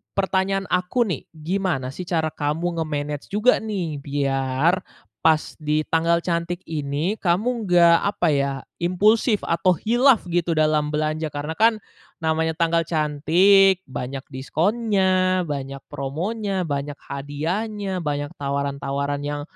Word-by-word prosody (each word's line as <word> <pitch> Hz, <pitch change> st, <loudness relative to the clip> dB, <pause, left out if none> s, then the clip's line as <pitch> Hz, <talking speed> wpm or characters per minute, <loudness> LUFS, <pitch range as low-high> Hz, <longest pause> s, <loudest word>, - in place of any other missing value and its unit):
pertanyaan 195 Hz, 0 st, +1 dB
aku 180 Hz, +7 st, +1 dB
nih, 180 Hz, -, -4 dB
gimana 160 Hz, -4 st, -2 dB
sih 180 Hz, +6 st, -7 dB
cara 160 Hz, -3 st, 0 dB
kamu 165 Hz, +4 st, -2 dB
nge-manage 150 Hz, -2 st, -3 dB
juga 210 Hz, +5 st, +3 dB
nih 185 Hz, -9 st, -3 dB
biar 140 Hz, +4 st, 0 dB, 0.5 s
pas 160 Hz, -1 st, +2 dB
di 155 Hz, 0 st, 0 dB
tanggal 165 Hz, +1 st, +2 dB
cantik 170 Hz, +1 st, -2 dB
ini, 155 Hz, +6 st, -2 dB
kamu 215 Hz, +6 st, 0 dB
nggak, 170 Hz, -1 st, +6 dB, 0.2 s
apa 175 Hz, -, +1 dB
ya, 140 Hz, -1 st, +1 dB, 0.3 s
impulsif 210 Hz, +5 st, +2 dB
atau 170 Hz, +2 st, +2 dB
khilaf 240 Hz, -, +3 dB
gitu 170 Hz, -1 st, +1 dB
dalam 155 Hz, -1 st, +2 dB
belanja? 155 Hz, +1 st, -1 dB
Karena 145 Hz, +2 st, -4 dB
kan 220 Hz, -1 st, +3 dB, 0.4 s
namanya 160 Hz, 0 st, +1 dB
tanggal 165 Hz, 0 st, +1 dB
cantik, 175 Hz, +5 st, +4 dB
banyak 130 Hz, +1 st, -5 dB
diskonnya, 185 Hz, -, +1 dB
banyak 140 Hz, -3 st, -5 dB
promonya, 185 Hz, +9 st, -2 dB
banyak 140 Hz, 0 st, -3 dB
hadiahnya, 185 Hz, +8 st, -3 dB
banyak 145 Hz, -2 st, -2 dB
tawaran-tawaran 140 Hz, 0 st, -2 dB
yang 145 Hz, 0 st, -3 dB
165 Hz, 125 wpm, -23 LUFS, 145-190 Hz, 0.5 s, nggak